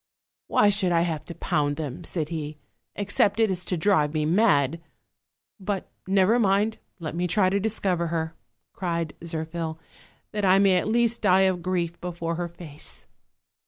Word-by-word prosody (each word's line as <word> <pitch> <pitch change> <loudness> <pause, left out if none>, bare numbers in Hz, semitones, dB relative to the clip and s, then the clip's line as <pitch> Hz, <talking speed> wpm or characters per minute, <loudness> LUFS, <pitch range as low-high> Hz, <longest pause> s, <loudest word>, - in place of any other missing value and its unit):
"Why 205 - +4
should 195 -3 +1
I 170 -1 +3
have 165 -3 -2
to 170 - -8
pound 145 -1 0
them," 145 -4 -5
said 155 -4 -3
he, 155 -2 -5 0.4
"except 205 +1 +1
it 220 -3 +4
is 180 -1 -1
to 180 - -1
drive 155 -4 +2
me 155 -1 +1
mad? 165 - +3 0.8
But 195 -1 -3 0.2
never 195 +4 +4
mind, 205 +1 +2 0.2
let 160 -4 -5
me 175 +2 -1
try 185 +1 +2
to 200 - +2
discover 190 -5 0
her," 160 -1 -2 0.4
cried 170 -3 -2
Zir 160 -1 -3
phil; 160 -1 -4 0.5
"that 210 -1 -3
I 190 0 +5
may 195 -2 +5
at 180 - 0
least 235 +1 +1
die 190 -2 +5
of 190 -2 +2
grief 175 -1 -2
before 170 -1 -3
her 175 +1 -2
face." 165 -3 -8
175 Hz, 170 wpm, -26 LUFS, 165-195 Hz, 0.8 s, I